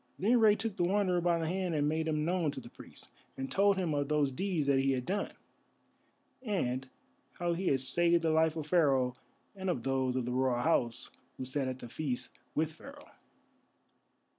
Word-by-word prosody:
Then 235 +6 +3
Rei 215 -2 +6
took 220 -2 -4
the - - +1
Wanderer 185 -1 +2
by 170 -1 +2
the 165 -1 -2
hand 180 -1 -1
and 145 -1 +1
made 160 +1 0
him 155 -1 0
known 175 -2 +1
to - - -6
the 120 -2 -12
priest, - - -13 0.3
and 135 0 -5
told 200 0 +3
him 175 -5 0
of 145 -1 0
those 150 -2 +1
deeds 170 +1 -1
that 140 -1 +3
he 135 0 +2
had 125 -1 -2
done, 200 +5 -2 1.1
and 135 - -2 0.4
how 175 -1 -1
he 180 +2 -3
had 135 -2 +2
saved 170 +5 +3
the 160 - +2
life 160 0 +3
of 155 -2 -4
Pharaoh 135 -7 +2 0.4
and 190 -1 -3
of 125 -10 -1
those 130 -1 0
of 130 -2 -1
the 125 - -3
Royal 125 -1 +1
House 120 -8 0 0.3
who 130 - -5
sat 130 +1 -2
at 130 -1 -3
the 120 - -9
feast 125 -2 -3 0.3
with 160 0 +1
Pharaoh. 280 - -13
155 Hz, 200 wpm, -32 LUFS, 130-180 Hz, 1.1 s, Rei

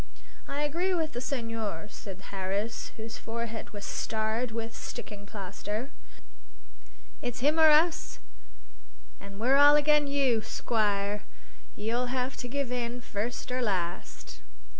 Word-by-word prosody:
"I 285 +1 -1
agree 350 +6 +1
with 320 -2 0
the 245 - -3
senhor," 230 - -2
said 195 -1 -9
Harris, 195 +3 -2
whose 225 0 -6
forehead 230 0 -4
was 205 -1 -7
starred 220 +2 -1
with 225 0 -4
sticking 205 -1 -7
plaster. 210 - -4 1.3
"It's 245 -1 -3
him 300 +4 +3
or 315 -1 +9
us, 325 +2 +4 1.0
an' 200 0 -10
we're 255 +6 +4
all 290 +1 +9
agen 295 0 +4
you, 270 -5 +3
squire. 205 -2 0 0.5
You'll 235 +4 0
have 255 +1 -1
to 245 - -4
give 275 0 -2
in, 245 0 -2
first 235 +3 -3
or 255 0 0
last." 175 - -2
235 Hz, 130 wpm, -30 LUFS, 210-275 Hz, 1.3 s, or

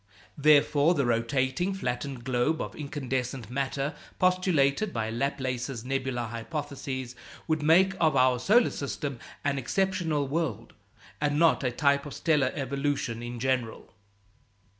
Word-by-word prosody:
Therefore, 150 +2 +5
the 140 -4 +1
rotating 130 +9 0
flattened 125 -5 -4
globe 130 +5 +1
of - - -5
incandescent 130 -5 -4
matter 140 +2 -2 0.2
postulated 185 -1 +2
by 110 -1 -2
Laplace's 130 -1 -2
nebular 130 -2 -2
hypothesis 130 +1 -5 0.3
would 155 -1 +1
make 180 +5 +5
of 155 -3 +3
our 130 -1 +4
solar 225 - +4
system 140 -2 -4 0.2
an 140 -1 0
exceptional 165 -1 0
world, 145 -5 -3 0.5
and 145 0 +1
not 165 -1 +4
a 130 - +2
type 140 +3 +1
of 145 - -8
stellar 145 -5 +2
evolution 135 -3 -2
in 120 0 -6
general. 125 -3 -2
140 Hz, 125 wpm, -28 LUFS, 125-155 Hz, 0.5 s, Therefore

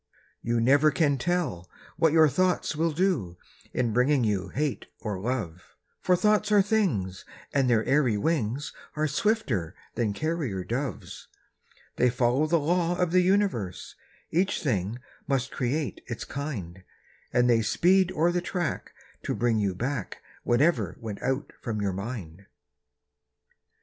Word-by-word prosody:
You 120 0 0
never 140 +6 +5
can 145 -3 +1
tell 155 - -1 0.3
what 165 -2 +3
your 160 0 +6
thoughts 180 +3 +1
will 165 +2 +1
do, 155 - 0 0.3
In 120 -3 0
bringing 130 +3 +3
you 100 -4 0
hate 145 0 -2
or 105 -4 -4
love; 100 -7 -4 0.3
For 180 - +3
thoughts 210 +2 +2
are 205 -2 +6
things, 140 - 0 0.3
and 135 -3 +2
their 115 -2 +3
airy 135 -6 +2
wings 135 +1 -1 0.2
Are 155 0 +1
swifter 140 - 0 0.2
than 110 -4 0
carrier 145 - -2
doves. 120 +4 -5 0.7
They 125 - +4
follow 125 +4 +2
the 170 +2 +3
law 175 +3 +1
of 180 -2 +1
the 185 +1 +5
universe— 180 - 0 0.4
Each 185 +4 +1
thing 110 - -1 0.3
must 135 -1 0
create 140 +3 -2
its 120 -2 -5
kind; 105 - -5 0.5
And 125 0 +3
they 115 -2 +4
speed 185 - +3
o'er 170 +1 +2
the 175 0 0
track 175 -1 -3 0.3
to - - -2
bring 115 -2 +1
you 100 -3 0
back 125 0 -4 0.2
Whatever 120 - +2
went 110 -3 -6
out 130 +2 -2
from 110 -3 -3
your 100 -2 -1
mind. 100 -3 -6
130 Hz, 145 wpm, -27 LUFS, 110-165 Hz, 0.7 s, your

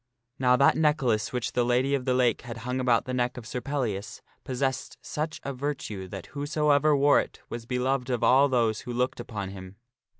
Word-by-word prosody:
Now 125 -1 +4
that 140 +2 +5
necklace 135 -9 +1
which 125 -1 -2
the 125 - +1
Lady 125 +3 +2
of 135 -3 0
the 130 -1 +2
Lake 125 -3 +2
had 120 -1 -7
hung 125 +1 -1
about 125 -3 +2
the 130 - -4
neck 125 0 0
of 120 - -8
Sir 125 +2 -4
Pellias 120 -7 -3 0.2
possessed 130 0 -2
such 155 +1 -4
a 140 - -3
virtue 125 -8 -4
that - - -7
whosoever 150 0 +2
wore 140 +1 +5
it - - -5
was 115 -1 -6
be 125 - -1
loved 130 0 0
of 125 -2 -1
all 135 +3 +5
those 115 -4 +1
who 125 - -6
looked 125 +2 -1
upon 100 -4 -5
him. 95 0 -10
125 Hz, 205 wpm, -27 LUFS, 120-140 Hz, 0.2 s, that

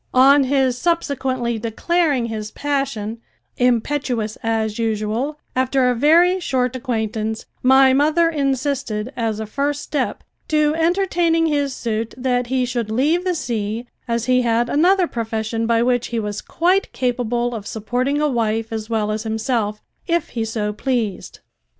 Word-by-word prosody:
On 275 +2 +6
his 260 -2 +1
subsequently 260 -8 -1
declaring 275 +4 0
his 215 -2 -4
passion, 270 -6 -2 0.4
impetuous 245 -2 0
as 220 -1 -1
usual, 225 +6 -1 0.2
after 260 0 +2
a - - -1
very 340 +8 +4
short 255 -6 -1
acquaintance, 220 -3 -2 0.2
my 265 +1 +6
mother 310 +5 +3
insisted 275 -6 -1
as 225 -2 -1
a 220 - -3
first 280 +6 -1
step 280 -4 -2 0.2
to 305 -1 +2
entertaining 340 -1 +2
his 285 -4 0
suit 225 -1 -3
that 250 -1 0
he 255 0 +1
should 240 -3 -3
leave 295 +10 +1
the 365 -1 0
sea, 225 -4 -3 0.2
as 235 -1 -1
he 255 0 +3
had 235 0 +1
another 360 +5 +4
profession 225 -3 -2
by 230 0 +3
which 245 -1 +1
he 235 - -2
was 210 -1 -4
quite 365 +4 +1
capable 245 -1 -1
of 210 -3 -6
supporting 250 +6 -1
a 300 - +2
wife 225 -3 -1
as 220 0 -4
well 215 -2 0
as 215 0 -2
himself, 220 -1 -2 0.2
if 340 -1 0
he 230 -2 -3
so 220 -2 -2
pleased. 225 -3 -3
245 Hz, 150 wpm, -20 LUFS, 225-285 Hz, 0.4 s, On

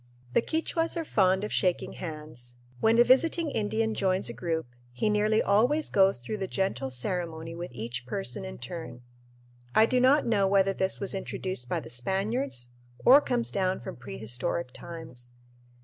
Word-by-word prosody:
The - - +4
Quichuas 330 +4 -1
are 330 - -2
fond 190 -5 +2
of 210 - -3
shaking 180 -2 0
hands. 150 -7 -8 0.2
When 225 - +4
a 240 - +8
visiting 305 +5 +3
Indian 220 +1 0
joins 185 - +1
a - - -5
group 160 +7 -2 0.3
he 125 - 0
nearly 210 +1 +2
always 245 +10 +2
goes 195 -4 +4
through 125 - -5
the 195 -2 -3
gentle 190 -9 -1
ceremony 165 +4 -2
with 170 +1 -6
each 120 +1 -5
person 125 - -2
in 65 0 -7
turn. 125 - -7 0.7
I 220 - +7
do 250 +2 +2
not 265 +4 +4
know 205 -4 +2
whether 195 0 +3
this 190 0 0
was 200 - -2
introduced 185 -7 -3
by - - -1
the 115 - -10
Spaniards 190 - -1 0.4
or 275 +4 +9
comes 245 -4 0
down 190 -1 0
from - - -7
prehistoric 120 - -4
times. 140 -8 -8
190 Hz, 165 wpm, -28 LUFS, -, 0.7 s, or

